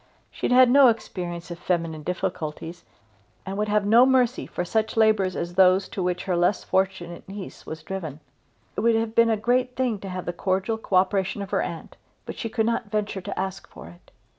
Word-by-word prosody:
She - - -3
had - - -3
had 255 -1 +7
no 275 0 +7
experience 175 -6 -3
of 170 - -7
feminine 165 -3 -2
difficulties, 175 -1 -4 0.6
and 195 - -4
would 210 +1 -1
have 210 -1 +1
no 230 +4 +6
mercy 255 -1 +2
for 175 - -4
such 220 +4 -1
labours 215 -4 +3
as 170 +1 -4
those 185 +1 +4
to 195 - -4
which 180 0 -1
her 185 - -1
less 175 +3 +1
fortunate 190 -2 -2
niece 195 -1 -9
was 160 0 -7
driven. 160 -5 -6 0.6
It - - -3
would 230 +1 +3
have 225 0 -1
been 230 0 +4
a 220 - +2
great 250 +3 0
thing 245 -5 0
to 195 - -7
have 185 -1 -5
the 175 - -3
cordial 190 +5 -1
co 200 - -3
operation 190 +1 +1
of 195 - -10
her - - +1
aunt; 165 -1 -6 0.3
but - - -6
she 225 - -4
could 220 -1 0
not 230 -2 -1
venture 205 -2 -2
to 195 +2 -5
ask 190 0 -4
for - - -12
it. 85 0 -18
195 Hz, 215 wpm, -25 LUFS, 180-220 Hz, 0.6 s, had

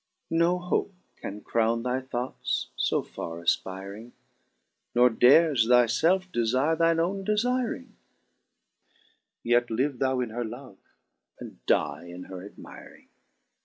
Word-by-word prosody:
No 170 +2 +3
hope 180 +2 -2 0.2
can 105 +1 -7
crowne 115 +1 0
thy 125 +1 -1
thoughts 125 -1 -3 0.2
fo - - 0
farre 85 +1 -7
afpiring. 100 +6 -3 0.8
Nor 125 0 +5
dares 130 +1 +5
thy 125 0 +6
felfe 180 +10 +1
defire 130 +7 +1
thine 165 0 +2
owne 190 +4 -1
defiring, 230 - -1 1.5
Yet 120 +1 +2
live 125 +3 -1
thou 130 -1 +1
in 120 -3 -3
her 120 +2 -3
love, 120 -2 -9 0.6
and - - -11
dye - - +1
in 90 +1 -9
her 95 -1 -9
admiring." 100 - -13
125 Hz, 125 wpm, -27 LUFS, 110-165 Hz, 1.5 s, thy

